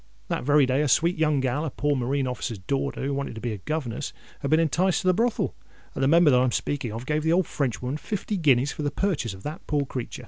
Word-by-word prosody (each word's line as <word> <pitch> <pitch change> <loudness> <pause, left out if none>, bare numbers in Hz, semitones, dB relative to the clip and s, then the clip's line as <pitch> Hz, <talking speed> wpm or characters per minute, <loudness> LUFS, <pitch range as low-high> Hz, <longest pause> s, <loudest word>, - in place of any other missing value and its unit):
That - - -1
very 145 +1 +5
day 130 +2 +1
a 150 - +1
sweet 170 +7 +3
young 155 -3 +2
gal—a 140 +5 -1
poor 145 +2 0
marine 135 +2 0
officer's 125 -2 -3
daughter, 135 +9 -2
who 140 +1 -1
wanted 140 -3 -3
to - - -6
be 115 -1 -3
a 105 - -6
governess—had 140 +1 -5
been 155 - +4
enticed 175 +5 +2
to - - -1
the 185 - +5
brothel, 230 +4 0 0.4
and 135 - -2
the - - +4
Member 165 0 +6
that 125 -1 +5
I'm 130 -1 +2
speaking 130 -4 -2
of 115 +3 -6
gave 150 +2 0
the 160 +1 +1
old 180 0 +3
Frenchwoman 130 0 -2
fifty 210 +5 -3
guineas 140 -5 +3
for - - -6
the 145 - 0
purchase 145 - -1
of 95 - -14
that 150 +2 -7
poor 145 -2 +1
creatur'." 130 -2 -5
140 Hz, 245 wpm, -26 LUFS, 130-155 Hz, 0.4 s, Member